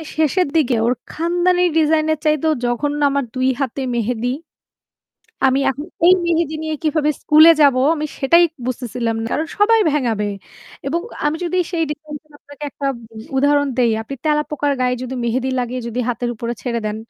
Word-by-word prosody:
শেষের 315 Hz, +3 st, +2 dB
দিকে 270 Hz, -6 st, +2 dB
ওর 245 Hz, -, +3 dB, 0.2 s
খানদানী 350 Hz, +2 st, +1 dB, 0.2 s
ডিজাইনের 315 Hz, 0 st, +2 dB
চাইতেও 305 Hz, +1 st, +2 dB
জঘন্য 290 Hz, +5 st, -1 dB
আমার 280 Hz, 0 st, 0 dB
২ 255 Hz, 0 st, +1 dB
হাতে 270 Hz, 0 st, -2 dB
মেহেদি, 235 Hz, +1 st, -1 dB, 1.2 s
আমি 265 Hz, +1 st, +3 dB
এখন 290 Hz, +3 st, -6 dB, 0.2 s
এই 365 Hz, -, +8 dB
মেহেদি 330 Hz, -2 st, 0 dB
নিয়ে 315 Hz, -1 st, -2 dB
কিভাবে 305 Hz, -1 st, +1 dB
স্কুলে 310 Hz, +2 st, +7 dB
যাব? 280 Hz, -3 st, +6 dB, 0.2 s
আমি 305 Hz, -1 st, -3 dB
সেটাই 335 Hz, +5 st, +5 dB, 0.2 s
বুঝতেছিলাম 240 Hz, -2 st, -3 dB
না। -, -, -3 dB
কারণ 315 Hz, -, -1 dB
সবাই 445 Hz, +2 st, +4 dB
ভেঙ্গাবে 230 Hz, -8 st, 0 dB, 0.6 s
এবং 325 Hz, +5 st, 0 dB, 0.2 s
আমি 295 Hz, +1 st, +1 dB
যদি 350 Hz, +1 st, -2 dB, 0.2 s
সেই 330 Hz, -2 st, +1 dB
ডিজাইনের 300 Hz, 0 st, -8 dB
আপনাকে 285 Hz, 0 st, -16 dB
১ -, -, -19 dB
টা 280 Hz, -, -1 dB, 0.5 s
উদাহরণ 285 Hz, +1 st, +3 dB
দেই, 240 Hz, -2 st, +3 dB
আপনি 275 Hz, -, -7 dB
তেলাপোকার 300 Hz, -1 st, 0 dB
গায়ে 250 Hz, 0 st, +1 dB
যদি 255 Hz, +1 st, -5 dB
মেহেদি 255 Hz, +3 st, -1 dB
লাগিয়ে 250 Hz, 0 st, -2 dB
যদি 235 Hz, +1 st, -5 dB
হাতের 240 Hz, 0 st, -2 dB
উপরে 235 Hz, +1 st, -4 dB
ছেড়ে 235 Hz, -2 st, -2 dB
দেন 210 Hz, 0 st, -3 dB
290 Hz, 165 wpm, -19 LUFS, 250-315 Hz, 1.2 s, এই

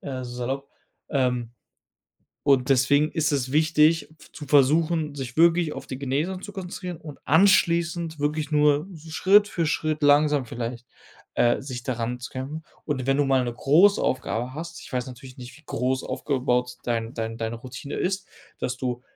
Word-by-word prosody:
äh, 130 Hz, -3 st, -5 dB
salopp. 125 Hz, +3 st, -4 dB, 0.4 s
Ähm, 125 Hz, -4 st, 0 dB, 0.9 s
und 135 Hz, -2 st, +3 dB
deswegen 140 Hz, +3 st, +3 dB
ist 155 Hz, -3 st, +1 dB
es 135 Hz, -2 st, -1 dB
wichtig 155 Hz, 0 st, +3 dB, 0.2 s
zu 150 Hz, -, -9 dB
versuchen, 150 Hz, +2 st, +3 dB
sich 130 Hz, -2 st, -6 dB
wirklich 170 Hz, -1 st, +4 dB
auf -, -, -8 dB
die 130 Hz, -, -6 dB
Genesung 150 Hz, +8 st, -2 dB
zu 205 Hz, -, -8 dB
konzentrieren 180 Hz, -2 st, -6 dB
und 150 Hz, -3 st, -10 dB
anschließend 170 Hz, -1 st, +3 dB
wirklich 150 Hz, +1 st, -1 dB
nur 150 Hz, +2 st, +3 dB
so 160 Hz, -1 st, -12 dB
Schritt 200 Hz, +5 st, +5 dB
für 175 Hz, -5 st, -2 dB
Schritt 155 Hz, 0 st, -1 dB
langsam 145 Hz, -1 st, +4 dB
vielleicht, 120 Hz, 0 st, -6 dB, 0.5 s
äh, 120 Hz, +2 st, +2 dB
sich 125 Hz, -3 st, -6 dB
da 130 Hz, -, -1 dB
ranzukämpfen. 125 Hz, +6 st, -5 dB, 0.2 s
Und 135 Hz, -4 st, -2 dB
wenn 135 Hz, 0 st, +2 dB
du 145 Hz, -, +2 dB
mal 135 Hz, -2 st, +2 dB
'ne 120 Hz, -, -3 dB
Großaufgabe 135 Hz, -, +2 dB
hast, 165 Hz, +1 st, -7 dB
ich -, -, -13 dB
weiß 125 Hz, 0 st, -1 dB
natürlich 130 Hz, +1 st, -11 dB
nicht, 125 Hz, +2 st, -10 dB
wie 160 Hz, -, -19 dB
groß 130 Hz, +2 st, -1 dB
aufgebaut 125 Hz, -3 st, -1 dB
dein 115 Hz, -1 st, -2 dB
dein 115 Hz, 0 st, -4 dB
deine 115 Hz, 0 st, -3 dB
Routine 130 Hz, +4 st, -8 dB
ist, 190 Hz, +1 st, -2 dB, 0.3 s
dass 125 Hz, -, -3 dB
du 125 Hz, -1 st, -3 dB
140 Hz, 165 wpm, -25 LUFS, 125-160 Hz, 0.9 s, Schritt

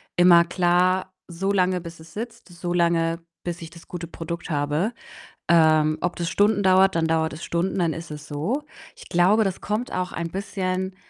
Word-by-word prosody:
immer 175 Hz, -1 st, +7 dB
klar, 180 Hz, +1 st, +2 dB, 0.2 s
so 190 Hz, +3 st, -2 dB
lange, 185 Hz, -2 st, +2 dB
bis 170 Hz, -1 st, -10 dB
es 160 Hz, +1 st, -14 dB
sitzt, 225 Hz, -2 st, -7 dB
so 175 Hz, 0 st, -5 dB
lange, 170 Hz, -1 st, +1 dB, 0.2 s
bis 170 Hz, -1 st, -5 dB
ich 165 Hz, -, -9 dB
das 170 Hz, 0 st, -15 dB
gute 175 Hz, -1 st, -6 dB
Produkt 170 Hz, 0 st, -6 dB
habe. 150 Hz, +9 st, 0 dB, 0.6 s
Ähm, 155 Hz, -2 st, +4 dB
ob 175 Hz, -, -2 dB
das 170 Hz, -1 st, -2 dB
Stunden 205 Hz, +1 st, +2 dB
dauert, 190 Hz, -1 st, +5 dB
dann 160 Hz, -1 st, +2 dB
dauert 160 Hz, 0 st, +1 dB
es 155 Hz, -, -8 dB
Stunden, 175 Hz, +3 st, -1 dB
dann 170 Hz, -3 st, +1 dB
ist 165 Hz, 0 st, -7 dB
es 150 Hz, -1 st, -8 dB
so. 175 Hz, -, -2 dB, 0.3 s
Ich -, -, -13 dB
glaube, 195 Hz, +6 st, +4 dB
das 190 Hz, -2 st, -2 dB
kommt 215 Hz, +4 st, -3 dB
auch 180 Hz, 0 st, -2 dB
ein 170 Hz, 0 st, -4 dB
bisschen 190 Hz, -1 st, -3 dB
175 Hz, 190 wpm, -24 LUFS, 165-190 Hz, 0.6 s, immer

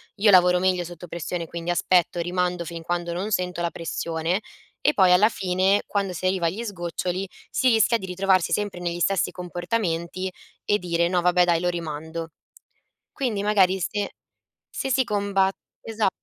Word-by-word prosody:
io 205 Hz, +1 st, +4 dB
lavoro 180 Hz, -1 st, +6 dB
meglio 185 Hz, -1 st, +1 dB
sotto 175 Hz, 0 st, -9 dB
pressione, 170 Hz, +1 st, -4 dB
quindi 170 Hz, +1 st, -6 dB
aspetto, 175 Hz, 0 st, +2 dB
rimando 180 Hz, 0 st, -1 dB
fin 165 Hz, 0 st, -6 dB
quando 175 Hz, +1 st, -2 dB
non 185 Hz, +5 st, -3 dB
sento 180 Hz, -3 st, -1 dB
la 170 Hz, -, 0 dB
pressione" 165 Hz, +2 st, -2 dB, 0.4 s
e -, -, +4 dB
poi 185 Hz, -2 st, +5 dB
alla 195 Hz, +5 st, +6 dB
fine 190 Hz, 0 st, +1 dB
quando 200 Hz, -2 st, -1 dB
si 180 Hz, +1 st, -5 dB
arriva 185 Hz, -2 st, +1 dB
agli 195 Hz, +8 st, -3 dB
sgoccioli, 185 Hz, -1 st, -3 dB, 0.2 s
si 260 Hz, -, +1 dB
rischia 230 Hz, 0 st, +4 dB
di 190 Hz, -, -7 dB
ritrovarsi 185 Hz, 0 st, +2 dB
sempre 205 Hz, -3 st, -1 dB
negli 175 Hz, -1 st, -3 dB
stessi 190 Hz, 0 st, +2 dB
comportamenti 180 Hz, 0 st, -3 dB, 0.3 s
e 205 Hz, -, +2 dB
dire: 170 Hz, -1 st, +1 dB
"No, 180 Hz, 0 st, +1 dB
vabbè, 180 Hz, 0 st, +4 dB
dai 170 Hz, -1 st, +2 dB
lo 180 Hz, -, +1 dB
rimando". 160 Hz, -1 st, -5 dB, 0.8 s
Quindi 230 Hz, -8 st, -2 dB
magari 195 Hz, -3 st, +3 dB
se 205 Hz, +3 st, -2 dB, 0.6 s
se 270 Hz, -, -4 dB
si 260 Hz, +1 st, +3 dB
comba 200 Hz, -3 st, +1 dB, 0.3 s
esa 220 Hz, -3 st, 0 dB
180 Hz, 165 wpm, -24 LUFS, 170-195 Hz, 0.8 s, lavoro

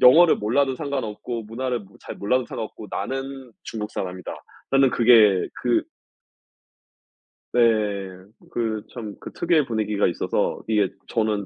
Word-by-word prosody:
'영어를 160 Hz, +7 st, +8 dB
몰라도 130 Hz, +5 st, +1 dB
상관없고 120 Hz, -5 st, -3 dB
문화를 120 Hz, +3 st, -2 dB
뭐 100 Hz, 0 st, -17 dB
잘 -, -, -8 dB
몰라도 125 Hz, +5 st, +1 dB
상관없고 110 Hz, -1 st, -6 dB
나는 135 Hz, +3 st, -4 dB
중국 105 Hz, -2 st, -5 dB
사람이다.'라는 95 Hz, +8 st, -1 dB
그게 110 Hz, -6 st, +6 dB
그 120 Hz, -1 st, +2 dB, 1.7 s
네. -, -, +3 dB, 0.9 s
그 110 Hz, -3 st, -2 dB
참 110 Hz, -5 st, -6 dB
그 -, -, -8 dB
특유의 165 Hz, -4 st, +2 dB
분위기가 105 Hz, -3 st, 0 dB
있어서 85 Hz, -, -1 dB
이게 105 Hz, -3 st, +2 dB, 0.2 s
저는 110 Hz, -3 st, 0 dB
115 Hz, 280 characters per minute, -24 LUFS, 105-130 Hz, 1.7 s, 영어를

